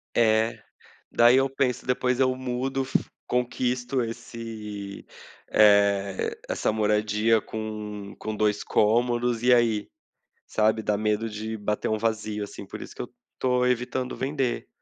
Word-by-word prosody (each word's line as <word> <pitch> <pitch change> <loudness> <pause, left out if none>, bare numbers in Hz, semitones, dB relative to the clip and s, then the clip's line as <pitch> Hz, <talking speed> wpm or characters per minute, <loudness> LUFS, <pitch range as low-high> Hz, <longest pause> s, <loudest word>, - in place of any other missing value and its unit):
É, 110 0 +3 0.5
daí 120 +2 +6
eu 135 0 +3
penso: 130 -3 -1
"Depois 125 0 +1
eu 130 -1 +3
mudo, 130 +1 -2
fi 135 - +1 0.3
conquisto 125 +1 0
esse, 110 -3 -6 0.4
eh, 100 -2 +3
essa - - 0
moradia 105 +1 +2
com 105 -2 -6
com 110 0 -4
2 105 -1 +1
cômodos, 120 +2 +2
e 125 0 +5
aí?", 115 -3 +2 0.6
sabe, 110 0 +1
dá 105 - +1
medo 105 +1 0
de 110 +1 -5
bater 105 0 -2
um 110 - +1
vazio, 110 -1 -1
assim, 100 - -8
por - - -8
isso - - -9
que - - -5
eu - - -6 0.3
estou 125 -1 +2
evitando 125 +1 -1
vender. 135 -2 -1
115 Hz, 140 wpm, -26 LUFS, 105-125 Hz, 0.6 s, daí